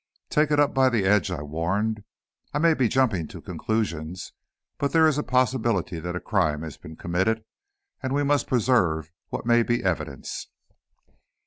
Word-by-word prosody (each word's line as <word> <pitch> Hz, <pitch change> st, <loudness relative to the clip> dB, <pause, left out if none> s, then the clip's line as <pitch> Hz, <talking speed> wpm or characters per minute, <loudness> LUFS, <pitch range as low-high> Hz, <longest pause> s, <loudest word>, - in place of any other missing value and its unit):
"Take 150 Hz, 0 st, +3 dB
it 150 Hz, -1 st, +2 dB
up 145 Hz, -, +3 dB
by 130 Hz, -1 st, +4 dB
the 115 Hz, -6 st, +1 dB
edge," 100 Hz, 0 st, +3 dB
I 85 Hz, -5 st, -4 dB
warned; 100 Hz, +8 st, -1 dB, 0.5 s
"I -, -, +3 dB
may 165 Hz, +2 st, +4 dB
be 130 Hz, -5 st, +2 dB
jumping 110 Hz, -10 st, +1 dB
to -, -, -10 dB
conclusions, 90 Hz, -6 st, -3 dB, 0.5 s
but 140 Hz, -, -1 dB
there 160 Hz, -1 st, +6 dB
is 150 Hz, -2 st, +2 dB
a -, -, -1 dB
possibility 120 Hz, -9 st, +1 dB
that 90 Hz, +2 st, -4 dB
a -, -, -1 dB
crime 75 Hz, -2 st, 0 dB
has 80 Hz, -4 st, -7 dB
been 80 Hz, +2 st, -11 dB
committed, 95 Hz, +7 st, 0 dB, 0.6 s
and 130 Hz, -2 st, -3 dB
we 145 Hz, +1 st, +1 dB
must 145 Hz, 0 st, +1 dB
preserve 90 Hz, -, +2 dB, 0.2 s
what -, -, -4 dB
may 120 Hz, 0 st, +5 dB
be 120 Hz, +1 st, 0 dB
evidence." 85 Hz, -7 st, -3 dB
110 Hz, 175 wpm, -25 LUFS, 85-130 Hz, 0.6 s, there